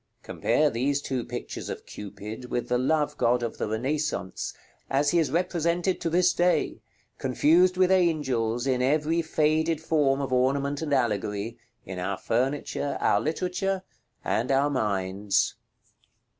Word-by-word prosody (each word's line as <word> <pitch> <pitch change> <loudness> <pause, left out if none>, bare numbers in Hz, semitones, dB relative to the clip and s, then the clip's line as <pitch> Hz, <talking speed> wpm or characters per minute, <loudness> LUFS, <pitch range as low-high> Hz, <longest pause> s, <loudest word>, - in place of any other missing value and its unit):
Compare 150 -1 +1
these 140 +4 0
two 130 -3 -3
pictures - - -6
of - - -6
Cupid 105 +4 -8
with 120 - -2
the 125 0 +2
Love 150 +3 +1
god 120 +1 +2
of 115 - -4
the - - -1
Renaissance, 130 -1 -2 0.4
as 145 +2 +2
he 175 - +3
is 160 - +1
represented 175 +2 0
to 170 - 0
this 180 +2 +3
day, 175 +1 +1 0.4
confused 170 +8 +3
with 185 0 +4
angels, 135 -10 +1
in 130 -2 +1
every 155 +5 +2
faded 160 0 +1
form 150 -4 +2
of 135 -2 -2
ornament 140 +3 +1
and 155 -2 -3
allegory, 110 -3 -1 0.3
in 95 -3 -6
our 95 +2 -2
furniture, 135 +3 -1
our 100 - +3
literature, 185 - -1 0.4
and 120 +4 0
our 140 +2 +3
minds. 100 -4 0
140 Hz, 145 wpm, -27 LUFS, 120-160 Hz, 0.4 s, with